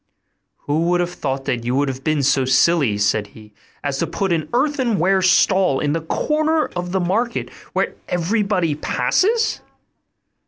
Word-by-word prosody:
'Who 155 +3 -1
would 175 0 +2
have 175 0 -1
thought 135 -1 -4 0.2
you 120 +2 -1
would 140 +1 +1
have 130 0 -5
been 155 -1 0
so 135 0 +3
silly,' 130 -3 +3
said 105 0 +1
he, 105 -1 -15 0.3
'as 140 -2 -2
to 170 - 0
put 185 +3 -1
an 160 -2 -2
earthenware 240 - +1
stall 185 -4 +3
in 145 -1 0
the 165 - -1
corner 310 - 0
of 180 0 -4
the 190 - 0
market, 220 +7 -1 0.2
where - - 0 0.2
everybody 180 -1 0
passes? 440 - 0
170 Hz, 155 wpm, -20 LUFS, 140-195 Hz, 0.3 s, so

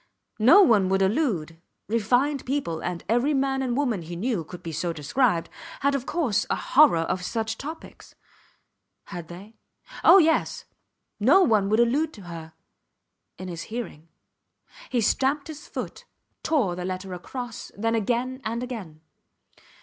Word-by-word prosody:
No 320 - +8
one 210 - +4
would 195 0 +2
allude... 190 - -1 0.3
Refined 245 +6 +1
people 255 - -2
and 175 -1 -4
every 245 +7 +2
man 270 0 0
and 250 -2 -1
woman 245 -10 0
he 170 +1 -7
knew 205 -1 -1
could 175 +3 -11
be 165 - -5
so 170 +3 -2
described 170 - +1 0.3
had, 280 +1 +2
of 270 -2 -2
course, 240 - 0
a - - +1
horror 275 - +4
of 180 +2 -2
such 220 +2 -2
topics. 310 +7 -10 0.9
Had 175 -4 -8
they? 195 +6 -12 0.5
Oh, - - +9
yes. 320 -3 +2 0.5
No 275 - +5
one 215 - +3
would 215 +2 +2
allude 285 +7 +2
to 205 - -12
her... 165 -2 -9 0.8
in 185 - -7
his 170 -2 -6
hearing. 220 -9 -6 0.8
He 245 - +1
stamped 275 +7 +1
his 305 -1 -9
foot, - - -6 0.4
tore 255 - +1
the 180 - -5
letter 185 +1 -4
across, 240 +6 -7
then 225 +2 0
again 245 +4 -1
and 230 +2 -3
again. 200 -12 -7
225 Hz, 150 wpm, -25 LUFS, 180-265 Hz, 0.9 s, Oh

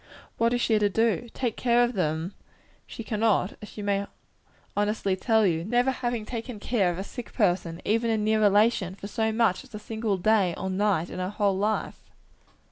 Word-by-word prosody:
What 230 0 +3
is 245 0 0
she 220 -2 +3
to 205 -1 +2
do? 230 +3 +1
Take 240 -4 -1
care 240 -1 +3
of 240 +1 0
them 160 -3 -1
herself - - -33
she 230 - -7
cannot, 215 -3 +1
as 210 - -9
she 210 - -8
may 200 0 0 0.7
honestly 205 -2 0
tell 220 +2 +2
you; 165 -4 +2
having 170 +5 -6
never 245 -2 0
taken 230 -1 -6
care 205 -4 +1
of 175 - -3
a 190 - -3
sick 240 +3 -9
person, 175 -1 0
even 230 +2 +1
a 225 - +2
near 215 +1 +1
relation, 205 -2 +3
for 200 - -10
so 220 +2 -1
much 220 -2 +1
as 255 -4 -13
a - - -3
single 220 -1 -2
day 195 -2 +2
or 190 +1 -3
night 190 -3 0
in - - -6
her 185 0 -2
whole 205 -1 +1
life! 210 +3 -1
210 Hz, 205 wpm, -26 LUFS, 190-230 Hz, 0.7 s, What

